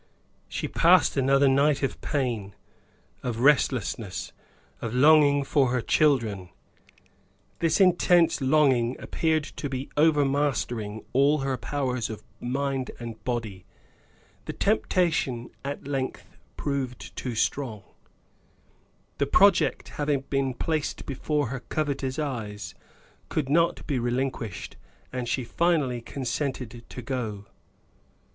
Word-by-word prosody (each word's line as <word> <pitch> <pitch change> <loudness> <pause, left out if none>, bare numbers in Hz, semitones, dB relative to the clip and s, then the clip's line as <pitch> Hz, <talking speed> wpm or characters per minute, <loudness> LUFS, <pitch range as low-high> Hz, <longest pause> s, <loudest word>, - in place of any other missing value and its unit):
She - - -3
passed - - +4
another 135 +1 +4
night 140 +1 +3
of 135 - -2
pain, 115 -8 -2 0.7
of 120 -2 -3
restlessness, 125 -7 +1 0.5
of 115 0 -3
longing 145 0 +6
for 135 -2 +2
her 125 +1 +1
children; 115 - +2 1.1
this 165 +2 +2
intense 175 -3 +4
longing 130 -3 +3
appeared 160 -2 0
to 145 -1 -6
be 135 +1 -4
overmastering 140 -8 +1
all 140 +3 +4
her 135 -1 0
powers 125 0 -2
of 110 -1 -7 0.2
mind 135 +1 -2
and 115 -2 -8
body. 115 -7 -3 0.8
The - - -4
temptation 170 - 0
at 140 0 -5
length 135 -2 -4 0.2
proved 135 -4 -4
too 125 -3 -4
strong; 110 -3 -1 1.4
the 140 - +2
project 195 +5 +4
having 145 -2 +1
been 135 -2 0
placed 155 +2 -2
before 145 0 -1
her 130 +1 -4
covetous 135 -2 -2
eyes 115 -9 -4 0.6
could 140 -4 -1
not 165 +3 +2
be 140 -4 -1
relinquished, 120 -3 -3 0.4
and 125 -2 -3
she 130 - 0
finally 140 -3 +1
consented 125 -2 -4
to 125 - -7
go. 110 -5 -4
135 Hz, 110 wpm, -26 LUFS, 120-145 Hz, 1.4 s, longing